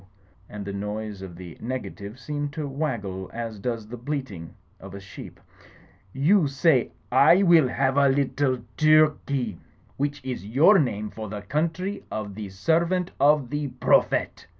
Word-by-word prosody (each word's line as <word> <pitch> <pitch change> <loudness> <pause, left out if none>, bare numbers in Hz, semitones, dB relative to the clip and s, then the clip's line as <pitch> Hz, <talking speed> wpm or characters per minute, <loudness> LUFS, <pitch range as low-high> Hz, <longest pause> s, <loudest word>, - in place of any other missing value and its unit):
And 105 -1 -7
the 100 - -5
noise 105 0 -5
of 95 -3 -8
the 85 -2 -10
nega 130 +2 -4
tive 100 +3 -9
seemed 145 +2 -4
to 150 -2 -4
waggle 115 - -3
as 115 -2 -5
does 115 -1 -3
the 125 - -7
bleating 120 - -5 0.2
of 95 0 -10
a - - -7
sheep. 100 0 -11 0.7
"You 155 - +3
say, 140 -2 +2 0.2
*I 155 +9 +6
will 170 -6 +6
have 130 +2 0
a 140 -1 +5
little 135 -1 0 0.2
Turkey,' 150 -6 +3 0.4
which 145 +1 -2
is 130 -5 -4
your 145 - +5
name 105 -7 -1
for 110 -2 -7
the 105 0 -6
Country 170 - -2
of 105 -2 -5
the 105 0 -7
Servant 170 - 0
of 145 -3 +3
the 145 0 -2
Prophet 125 -1 +1
130 Hz, 155 wpm, -25 LUFS, 105-150 Hz, 0.7 s, I